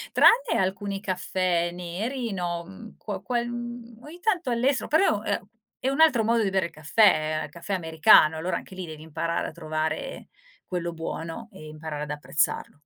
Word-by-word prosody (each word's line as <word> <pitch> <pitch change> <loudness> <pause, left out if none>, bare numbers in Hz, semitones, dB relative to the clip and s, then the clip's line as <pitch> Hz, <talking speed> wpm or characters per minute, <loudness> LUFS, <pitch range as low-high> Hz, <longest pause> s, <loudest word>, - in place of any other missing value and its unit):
Tranne - - +5
alcuni 195 +1 -1
caffè 180 -2 0
neri, 205 +7 -4
no, 175 -2 -3
mhmm, 215 +4 -12
quo 210 - -5
quel 240 -1 -1
ogni 240 +6 -8
tanto 355 - 0
all'estero, 250 +3 +1
però, 300 - +3
ehm, 200 -1 -2 0.3
è 260 - -2
un 275 +4 +2
altro 265 -9 +5
modo 230 0 +3
di 195 - +1
bere 190 -2 +1
il 170 - -6
caffè, 155 -2 +3
il - - -11
caffè 170 +5 -6
americano, 160 -2 +5
allora, 170 +4 -1
anche 190 - -10
lì, 185 -1 -5
devi 155 -1 -9
imparare 165 +2 -2
a - - -6
trovare 155 -1 -3 0.4
quello 175 -2 -2
buono 165 +5 -5
e 155 -5 -11
imparare 155 -1 -6
ad 150 - -7
apprezzarlo. 150 0 -1
185 Hz, 175 wpm, -26 LUFS, 160-235 Hz, 0.4 s, Tranne